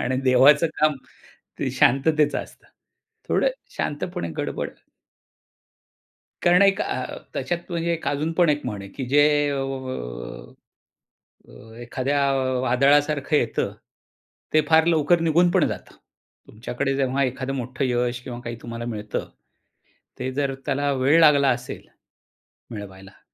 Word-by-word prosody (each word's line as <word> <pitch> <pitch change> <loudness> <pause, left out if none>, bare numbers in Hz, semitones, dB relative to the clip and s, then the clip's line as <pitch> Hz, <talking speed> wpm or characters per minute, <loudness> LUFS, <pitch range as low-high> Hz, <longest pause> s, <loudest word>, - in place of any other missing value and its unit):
आणि 130 - -1
देवाचं 140 +5 +6
काम 155 -1 +4 0.6
ते - - -1
शांततेचं 150 +3 +2
असतं." - - -17 0.6
थोडं - - +2 0.3
शांतपणे 145 - -3
गडबड. - - -3 1.7
कारण 175 +3 +5
एक 195 0 +3
अ, - - -3 0.2
त्याच्यात 175 +1 -4 0.4
अजून 150 +3 -1
पण 170 0 +3
एक 150 -1 +1
म्हण 105 -2 -4
आहे 100 - -9
की 135 - -6
जे 145 +2 +5 0.3
अ, 140 - -2 1.9
अ, 110 +1 -15
एखाद्या 135 +4 -1 0.4
वादळासारखं 140 +4 +2
येतं, 120 -6 0 0.8
ते 155 - +5
फार 160 0 +5
लवकर 170 +1 +3
निघून 165 +2 +3
पण - - +3
जातं. - - -8 0.5
तुमच्याकडे 125 +5 -3
जेव्हा 135 0 +1
एखादा 130 +1 -3
मोठं 130 +1 -3
यश 125 -1 0
किंवा 120 -1 -7
काही 120 0 -5
तुम्हाला 115 0 -6
मिळतं, 105 -3 -4 0.9
ते 130 +1 -3
जर 140 0 -1
त्याला 145 0 0
वेळ 135 +5 +3
लागला 140 -3 +6
असेल, 125 0 -4 0.8
मिळवायला. 95 -3 -10
135 Hz, 120 wpm, -23 LUFS, 125-150 Hz, 1.9 s, देवाचं